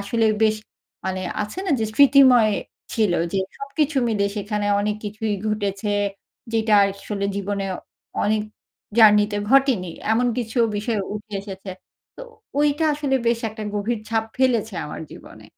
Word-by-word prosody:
আসলে 225 +3 +1 0.2
বেশ 215 0 +3 0.5
মানে 185 0 -2 0.2
আছে 210 - -7
না, - - 0
যে - - +1
স্মৃতিময় 255 -4 +6 0.4
ছিল 215 -5 +2 0.2
যে 195 - +1 0.2
সবকিছু 280 +1 -1
মিলে 205 -3 +1
সেখানে 205 0 -2
অনেক 210 +1 -1
কিছুই 210 0 -2
ঘটেছে, 205 -1 -2 0.6
যেটা 220 -1 +2
আসলে 200 +1 -3
জীবনে 200 0 -2 0.6
অনেক 215 +1 +1 0.6
জার্নিতে 210 -1 +6
ঘটেনি। 260 -10 +3 0.2
এমন 245 +2 +2
কিছু 235 0 -3 0.2
বিষয় 215 0 -1
উঠে 210 0 -8
এসেছে। 195 -1 -8 0.5
তো - - -8 0.4
ওইটা 295 +2 +2
আসলে 285 -2 0
বেশ 235 0 +3
একটা 215 0 -8
গভীর 210 +2 -1
ছাপ 225 -1 0
ফেলেছে 235 -6 +1
আমার - - -7
জীবনে। - - -13
215 Hz, 140 wpm, -22 LUFS, 205-240 Hz, 0.6 s, স্মৃতিময়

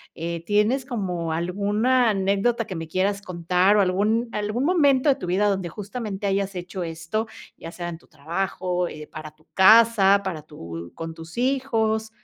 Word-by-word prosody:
eh, 170 0 -4
¿tienes 215 +7 +2
como 180 - -3
alguna 205 +9 +1
anécdota 200 +4 +1
que 190 -4 -6
me 165 0 -5
quieras 195 +4 0
contar, 180 +2 +2
o, 210 - +5
algún 210 +5 +1
algún 210 +4 -2
momento 290 -4 +3
de 275 - +4
tu 265 - -7
vida 195 +4 +2
donde 190 -3 -1
justamente 205 +1 -5
hayas 195 0 -1
hecho 180 +1 -6
esto, 165 +6 -3 0.3
ya 165 - -9
sea 175 -1 -5
en 170 - -6
tu - - -24
trabajo, 180 +3 -2
eh, 155 -2 -8
para 155 -1 -8
tu 155 +1 -30
casa, 200 -1 +6
para 170 -6 -4
tu 85 - -9
con 165 0 -6
tus 165 +4 -11
hijos? 230 -4 0
195 Hz, 170 wpm, -24 LUFS, 170-220 Hz, 0.3 s, casa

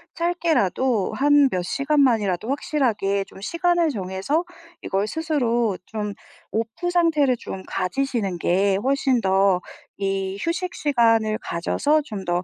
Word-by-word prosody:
짧게라도 265 - +1
한 290 +1 +4
몇 180 - 0
시간만이라도 235 - +1
확실하게 225 -9 0
좀 - - -15
시간을 340 - +1
정해서 195 - -2 0.4
이걸 195 +2 -1
스스로 240 - 0
좀 210 -2 -4 0.4
off 230 +11 -2
상태를 310 -8 +3
좀 190 - -7
가지시는 195 -1 -2
게 190 +3 +2
훨씬 265 -1 +1
더 190 -1 +3 0.4
이 195 -1 -2
휴식 360 +2 -2
시간을 225 -6 +2
가져서 290 - 0
좀 210 -8 -7
더 175 +1 0
230 Hz, 265 characters per minute, -23 LUFS, 195-290 Hz, 0.4 s, 한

